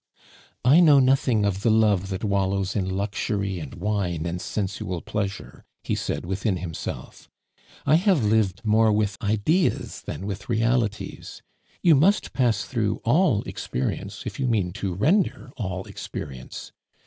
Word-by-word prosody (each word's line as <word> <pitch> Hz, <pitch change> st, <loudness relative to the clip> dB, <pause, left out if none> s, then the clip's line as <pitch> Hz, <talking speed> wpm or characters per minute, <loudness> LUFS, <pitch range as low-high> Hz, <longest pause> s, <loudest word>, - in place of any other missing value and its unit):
"I 140 Hz, +7 st, +7 dB
know 155 Hz, -5 st, +7 dB
nothing 130 Hz, -5 st, +3 dB
of 100 Hz, -1 st, -1 dB
the 115 Hz, -, +2 dB
love 105 Hz, -4 st, +3 dB
that 95 Hz, +1 st, -4 dB
wallows 100 Hz, -1 st, 0 dB
in 95 Hz, -3 st, 0 dB
luxury 100 Hz, 0 st, -2 dB
and 75 Hz, -4 st, -8 dB
wine 90 Hz, -4 st, -1 dB
and 85 Hz, +1 st, -3 dB
sensual 95 Hz, -4 st, -3 dB
pleasure," 100 Hz, -2 st, -4 dB, 0.2 s
he -, -, -2 dB
said -, -, -2 dB
within 95 Hz, +1 st, -1 dB
himself. 85 Hz, -3 st, -7 dB, 0.6 s
"I 150 Hz, +3 st, +5 dB
have 180 Hz, -, +2 dB
lived 105 Hz, 0 st, +1 dB
more 110 Hz, +1 st, +4 dB
with 105 Hz, -1 st, +1 dB
ideas 110 Hz, -, 0 dB
than 85 Hz, +6 st, -6 dB
with 100 Hz, -2 st, -6 dB
realities. 115 Hz, -2 st, -1 dB, 0.4 s
You 170 Hz, -, +7 dB
must 175 Hz, +9 st, +3 dB
pass 125 Hz, -3 st, +1 dB
through 110 Hz, -5 st, -1 dB
all 125 Hz, -, +3 dB
experience 65 Hz, -, -4 dB
if -, -, -6 dB
you 135 Hz, -, 0 dB
mean 105 Hz, -7 st, +1 dB
to 95 Hz, -3 st, -3 dB
render 150 Hz, -, +1 dB
all 95 Hz, -4 st, -4 dB
experience. 65 Hz, -3 st, -8 dB
105 Hz, 145 wpm, -25 LUFS, 95-120 Hz, 0.6 s, I